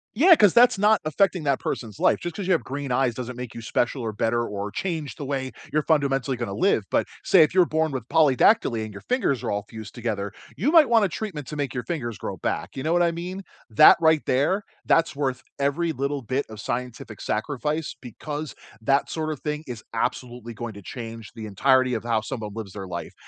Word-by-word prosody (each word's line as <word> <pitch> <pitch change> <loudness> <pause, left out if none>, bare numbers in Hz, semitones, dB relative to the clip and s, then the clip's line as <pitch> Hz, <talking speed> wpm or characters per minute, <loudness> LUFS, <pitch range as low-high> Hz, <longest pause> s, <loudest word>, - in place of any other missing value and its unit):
Yeah, 335 - +7
'cause 205 -7 +5
that's 240 -4 +6
not 215 +1 +4
affecting 180 +1 +1
that 140 -2 +1
person's 110 -5 -5
life, - - +3
just 175 -2 -5
'cause 195 -3 -4
you 185 - +4
have 165 - +1
green 140 -1 -5
eyes 125 -1 +2
doesn't 125 0 -6
make 125 -2 -6
you 115 - -8
special 120 +3 -1
or 110 -1 -2
better 115 +3 0
or 105 -1 -4
change 160 -6 -3
the 145 - -6
way 130 -1 -3 0.2
you're 155 -1 +1
fundamentally 135 -4 +1
gonna 120 -5 -4
live. - - +2
But - - +1 0.2
say 175 -5 +6
if 155 - 0
you're 185 -2 +5
born 160 -1 0
with 130 -3 -5
polydactyly 140 - +4
and 110 - -7
your 100 - -10
fingers 235 - 0
are - - -2
all 100 0 -2
fused 110 -2 -9
together, 100 -3 -3 0.2
you 260 - +1
might 320 -6 +7
want 225 -3 +5
a - - -1
treatment 165 -9 -5
to 150 - -6
make 140 -3 -2
your 125 - -2
fingers 120 - -4
grow - - -5
back, 85 +5 -3
you 130 - -4
know 160 - 0
what 175 0 +4
I 170 - +2
mean? 180 +3 -6 0.3
That 110 +8 +8
right 160 -1 +4
there, 150 +11 +1 0.2
that's 165 -3 +2
worth 135 -3 -2 0.2
every 155 +4 0
little 140 0 -2
bit 130 +5 -1
of 110 -1 -10
scientific 120 -1 -5
sacrifice 150 +7 -2
because 145 +4 -6 0.3
that 135 +5 +2
sort 155 -1 -2
of 145 - -5
thing 150 0 -3
is 120 -3 -7
absolutely 120 0 -3
going 120 -2 -6
to 100 - -11
change 115 0 -8
the 110 -2 -7
entirety 130 +5 +3
of 110 - -2
how 115 -2 +1
someone 110 -2 -6
lives 105 -4 -7
their 95 -2 -7
life. 85 -1 -6
135 Hz, 225 wpm, -24 LUFS, 115-160 Hz, 0.3 s, That